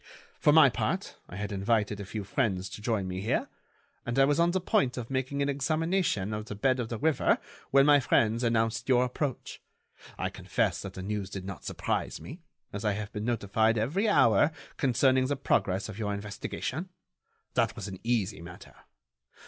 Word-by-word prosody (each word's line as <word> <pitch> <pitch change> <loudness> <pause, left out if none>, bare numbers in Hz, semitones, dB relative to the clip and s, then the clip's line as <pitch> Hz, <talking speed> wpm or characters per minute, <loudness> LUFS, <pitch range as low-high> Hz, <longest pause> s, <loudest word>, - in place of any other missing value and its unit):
For - - +5
my - - +7
part - - -2
I - - -8
had 105 +1 -4
invited 105 +1 0
a 100 - -5
few 105 0 -4
friends 95 -4 -1
to 105 - -9
join 105 -4 -1
me 90 0 -4
here, 110 - 0 0.6
and 120 +2 -3
I 135 - +6
was 145 +2 +1
on 170 0 +4
the 190 +2 +1
point 135 -8 +1
of 120 +1 -5
making 135 +2 -1
an - - 0
examination 155 - 0
of 105 0 -4
the 105 - -6
bed 130 +5 +1
of 115 -2 -3
the 115 - -3
river 155 +2 +2 0.3
when 135 0 +5
my 145 -1 +6
friends 115 -3 +2
announced 115 +1 0
your 125 -1 +5
approach. 130 +2 -4 0.6
I - - -2
confess - - -1
that - - -7
the 95 - -6
news 100 -1 -3
did 95 -1 -6
not 95 -4 -7
surprise - - -2
me, 160 +7 -10 0.3
as 105 - -4
I 105 -2 +2
have 105 +1 -5
been 105 0 -4
notified 110 -1 +1
every 165 - +1
hour 115 - +5 0.2
concerning 130 0 +3
the 145 - 0
progress 100 -7 0
of 110 -1 -8
your 105 -2 -1
investigation. 125 - -5 0.6
That - - +1
was - - -6
an 95 -1 -7
easy 110 -7 0
matter. 90 +1 -11
115 Hz, 190 wpm, -29 LUFS, 105-135 Hz, 0.6 s, my